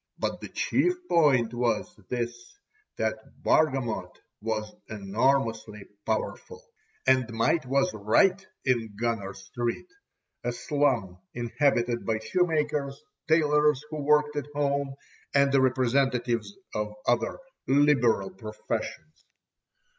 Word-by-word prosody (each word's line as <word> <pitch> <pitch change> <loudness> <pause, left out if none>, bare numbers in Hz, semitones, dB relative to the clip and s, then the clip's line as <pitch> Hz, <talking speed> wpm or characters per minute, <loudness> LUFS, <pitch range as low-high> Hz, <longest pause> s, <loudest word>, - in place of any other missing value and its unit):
But - - -2
the - - -7
chief 360 0 +1
point 135 - +3
was 120 +8 -1
this 120 - -4 0.4
that - - -1 0.2
Bargamot 135 -8 +2 0.3
was 110 -1 -3 0.2
enormously 110 0 0 0.2
powerful; 285 - -3 0.5
and 130 -2 +3
might 115 +6 +1
was 135 -1 +2
right 145 - +3 0.2
in 115 -5 0
Gunner 115 -5 -2
Street, 120 - -4 0.6
a 120 0 -1
slum 120 -11 0 0.2
inhabited 120 -1 +1
by 110 -1 0
shoemakers, 150 +1 0 0.3
tailors 150 -2 +3
who 155 -1 -3
worked 150 +1 +3
at 145 - -2
home, 140 -1 0 0.4
and 140 0 +5
the 135 -1 +4
representatives 125 - +1 0.2
of 105 0 -3
other 120 0 +1 0.3
"liberal" 130 -8 +3
professions. 110 +8 -6
130 Hz, 105 wpm, -27 LUFS, 115-145 Hz, 0.6 s, and